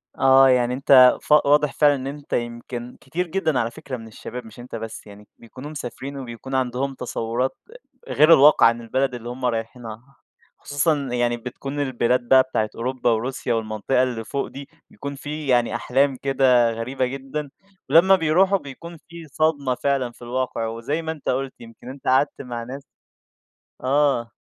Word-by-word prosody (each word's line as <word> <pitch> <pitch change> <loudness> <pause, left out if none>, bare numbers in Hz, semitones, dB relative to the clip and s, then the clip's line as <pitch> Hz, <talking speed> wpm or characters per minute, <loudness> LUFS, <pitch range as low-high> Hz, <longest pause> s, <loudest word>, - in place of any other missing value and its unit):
آه، 135 0 +6
يعني 125 -1 +2
أنت 130 -1 +6
ف - - -9
واضح 150 0 +3
فعلًا 145 -1 +4
إن 135 0 -5
أنت 145 0 -8
يمكن 120 +1 -4
كتير 170 +7 -3
جدًا 160 -5 0
على 115 0 -1
فكرة 130 +1 -7
من 115 -1 -11
الشباب 115 +2 -8
مش 110 +2 -14
أنت 120 -1 -9
بس 115 -1 -7
يعني، 105 0 -14
بيكونوا 130 +5 -11
مسافرين 140 0 -7
وبيكون 130 +1 -7
عندهم 130 +1 -1
تصوّرات 120 +1 -3 0.5
أ - - -4
غير 155 +2 +6
الواقع 150 +1 +6
عن 115 +1 +3
البلد 130 +2 -1
اللي 120 0 -7
هُم 125 +1 -5
رايحينها. 115 +2 -5 0.4
خصوصًا 145 +2 0 0.2
يعني 120 -1 0
بتكون 135 +4 -6
البلاد 125 -2 +1
بقى 130 +1 +6
بتاعة 110 -5 -2
أوروبا، 125 +1 -1
وروسيا 120 +2 -2
والمنطقة 110 +3 0
اللي 120 -3 -3
فوق 140 +4 -3
دي، 140 0 -10 0.2
بيكون 140 0 -7
في 150 +1 -6
يعني 120 -3 +2
أحلام 135 +3 +1
كده 130 -3 +3
غريبة 125 +3 -2
جدًا، 135 +3 -5 0.4
ولمّا 190 +4 +6
بيروحوا 185 +3 +3
بيكون 170 +2 -10
في 165 -1 -11
صدمة 145 -4 0
فعلًا 130 -1 -1
في - - -23
الواقع، 120 -1 -2
وزي 115 +8 -3
ما 160 0 -3
أنت 155 -3 -6
قُلت 135 +1 -1
يمكن 115 +2 -12
أنت 135 +1 -10
قعدت 135 +3 +2
مع 120 -3 -6
ناس 135 +3 -8 1.0
آه. 135 -3 +1
130 Hz, 170 wpm, -22 LUFS, 120-140 Hz, 1.0 s, آه